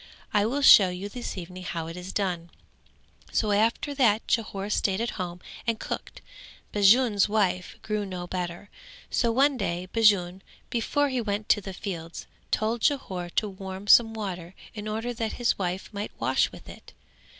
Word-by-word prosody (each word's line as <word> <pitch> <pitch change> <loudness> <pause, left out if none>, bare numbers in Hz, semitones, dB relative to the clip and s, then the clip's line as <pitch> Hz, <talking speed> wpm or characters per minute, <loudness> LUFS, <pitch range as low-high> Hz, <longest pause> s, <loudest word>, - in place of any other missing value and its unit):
I 205 0 +3
will 280 +4 -1
show 195 -7 +9
you 180 +3 -5
this 240 -1 -6
evening 185 +1 -7
how 170 -2 -4
it 165 +1 -7
is 180 +1 -7
done." 180 -4 -2 0.8
So 215 -2 +1
after 225 +7 +1
that 230 -6 +3
Jhore 210 -3 -1
stayed 195 -1 +1
at 235 +1 -1
home 180 0 -5 0.3
and 230 -1 0
cooked. - - -6 0.5
Bajun's 205 +1 +5
wife 190 -4 0
grew 215 -1 -1
no 185 -3 -5
better, 175 +2 -5 0.4
so 235 - +2
one 275 +3 +3
day 180 -4 -2
Bajun, 195 -5 +3 0.3
before 285 +5 +1
he 255 -2 -1
went 210 -1 -3
to 205 - +4
the 195 - -6
fields, 170 -3 -6 0.2
told 220 +2 0
Jhore 190 -12 0
to 215 - +2
warm 190 0 -7
some 225 +1 +6
water 185 -4 -5 0.2
in 210 -1 -6
order 225 +3 -3
that 225 -2 -3
his 240 -3 0
wife 185 +2 -3
might 205 +1 -4
wash - - +2
with - - -13
it. - - -12
205 Hz, 170 wpm, -27 LUFS, 185-225 Hz, 0.8 s, show